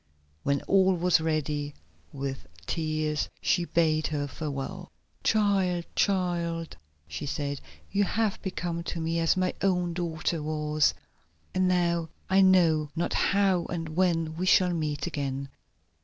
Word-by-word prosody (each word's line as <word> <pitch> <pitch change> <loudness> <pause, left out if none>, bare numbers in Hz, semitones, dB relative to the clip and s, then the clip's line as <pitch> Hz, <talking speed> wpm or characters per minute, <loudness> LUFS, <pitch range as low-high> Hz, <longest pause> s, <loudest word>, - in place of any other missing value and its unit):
When 140 0 0
all 190 -1 +4
was 175 -1 +3
ready, 150 -2 -1 0.4
with 135 - -5 0.2
tears 155 - -1
she 175 -1 +1
bade 160 -2 +2
her 145 -2 -2
farewell. 140 -1 -5 0.3
"Child, 195 -5 +2
child," 170 -4 0 0.3
she 75 - -5
said, 140 0 -3 0.3
"you 205 +1 +2
have 215 0 0
become 175 -3 -3
to 170 - -3
me 165 +1 -1
as 165 +2 +2
my 185 0 +1
own 180 -3 +1
daughter 165 -2 -2
was, 150 0 +1 0.6
and 185 0 +2
now 170 -2 +1 0.2
I 190 +1 +6
know 170 -5 +4
not 170 - -1
how 195 -3 +2
and 165 -2 -4
when 165 -1 +1
we 185 +2 -1
shall 180 -1 +5
meet 150 -3 -2
again." 140 -4 -3
165 Hz, 135 wpm, -28 LUFS, 150-180 Hz, 0.6 s, I